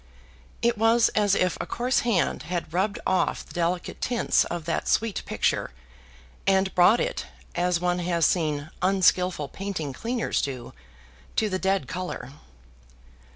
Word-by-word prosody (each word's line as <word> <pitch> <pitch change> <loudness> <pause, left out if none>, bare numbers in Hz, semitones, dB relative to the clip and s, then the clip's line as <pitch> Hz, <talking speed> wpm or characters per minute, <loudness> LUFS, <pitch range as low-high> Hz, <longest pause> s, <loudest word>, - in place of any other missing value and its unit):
It 235 -2 +2
was 225 +1 +4
as 205 -2 +2
if 185 -1 +1
a - - -5
coarse 250 +2 +1
hand 225 -7 +1
had 175 -3 -3
rubbed 195 +3 0
off 185 - +1
the - - -14
delicate 175 +1 -2
tints 240 -2 +2
of 170 -2 -5
that 165 - -2
sweet 225 -2 +1
picture, - - 0 0.7
and 190 0 +3
brought 190 +7 +5
it, - - -2 0.3
as 175 0 +1
one 180 0 0
has 170 -2 +1
seen 155 -3 0
unskilful 185 -5 +2
painting 185 -7 -4
cleaners 235 - -1
do, 130 -4 -5 0.6
to 215 - +2
the 185 - -1
dead 190 -7 0
color. 175 -6 -5
185 Hz, 145 wpm, -26 LUFS, 170-205 Hz, 0.7 s, brought